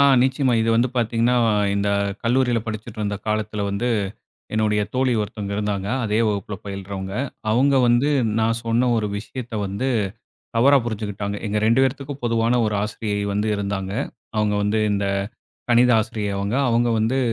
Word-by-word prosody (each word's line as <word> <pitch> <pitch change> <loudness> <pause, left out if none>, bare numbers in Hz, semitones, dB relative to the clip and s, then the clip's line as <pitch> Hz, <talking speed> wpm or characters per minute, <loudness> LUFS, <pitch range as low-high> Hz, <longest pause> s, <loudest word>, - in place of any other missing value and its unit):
ஆ, - - +6 0.2
நிச்சயமா. 130 0 +2
இது 115 - +1
வந்து 120 +2 +3
பாத்தீங்கன்னா, 115 +1 +2 0.4
இந்த 100 0 0 0.3
கல்லூரியில 120 0 +2
படிச்சிட்டு 110 0 -6
இருந்த 100 -1 -1
காலத்தில 105 -1 -1
வந்து, 105 +5 -1 0.7
என்னுடைய 105 -1 +2
தோழி 130 -1 +2
ஒருத்தவங்க 105 -1 -4
இருந்தாங்க. 100 -2 -2 0.2
அதே 105 0 0
வகுப்புல 100 0 -3
பயில்றவங்க. 95 0 -5 0.4
அவுங்க 135 +5 +3
வந்து, 120 +5 +3 0.3
நான் 115 +1 +1
சொன்ன 115 +2 +2
ஒரு 105 -1 0
விஷயத்த 115 +3 -7
வந்து, 100 +8 -2 0.7
தவறா 140 +4 +6
புருஞ்சுக்கிட்டாங்க. 105 -2 -3
எங்க 105 +1 0
2 115 +4 +4
பேருத்துக்கும், 140 +1 -3
பொதுவான 115 +1 +2
ஒரு 105 - -1
ஆசிரியை 105 -1 -3
வந்து 105 +2 0
இருந்தாங்க. 100 -1 -3 0.4
அவுங்க 105 -1 +1
வந்து, 110 +1 +1
இந்த 100 0 0 0.6
கணித 120 +1 +5
ஆசிரியை 110 -2 -3
அவுங்க. 100 +5 -1
அவுங்க 120 +1 +2
வந்து 115 +5 +1
110 Hz, 150 wpm, -22 LUFS, 105-120 Hz, 0.7 s, ஆ